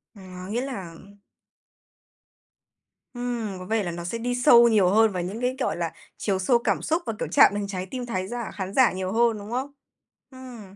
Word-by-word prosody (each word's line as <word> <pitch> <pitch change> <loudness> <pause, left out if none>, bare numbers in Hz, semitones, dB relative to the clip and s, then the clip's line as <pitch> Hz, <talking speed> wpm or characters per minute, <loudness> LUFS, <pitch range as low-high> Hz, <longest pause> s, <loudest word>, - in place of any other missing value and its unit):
Ờ, 200 - -13 0.3
nghĩa 235 +3 -1
là 195 -11 -6 2.2
Ừm, 240 -5 -4
có 185 - -8
vẻ 220 +2 0
là 175 - -3
nó 170 0 -6
sẽ 230 +6 -3
đi 245 +1 -2
sâu 240 -1 +7
nhiều 205 -5 +4
hơn 220 +2 +4
vào 180 -2 -3
những 205 +7 -5
cái, 250 +1 0
gọi 250 - -1
là, 165 -2 -2 0.3
chiều 195 -3 -1
sâu 235 +6 +3
cảm - - 0
xúc 325 +3 0
và, 225 - -2
kiểu, - - -2
chạm - - +5
đến 205 -1 -2
trái 185 -2 -4
tim 250 -1 -4
thái 185 -5 -3
giả 240 0 -5
khán 190 0 -5
giả 260 -3 +5
nhiều 185 0 -4
hơn, 230 0 +2
đúng 205 +2 -9
không? 260 +4 -3 0.6
Ừm. 245 -7 -11
220 Hz, 205 wpm, -25 LUFS, 190-245 Hz, 2.2 s, sâu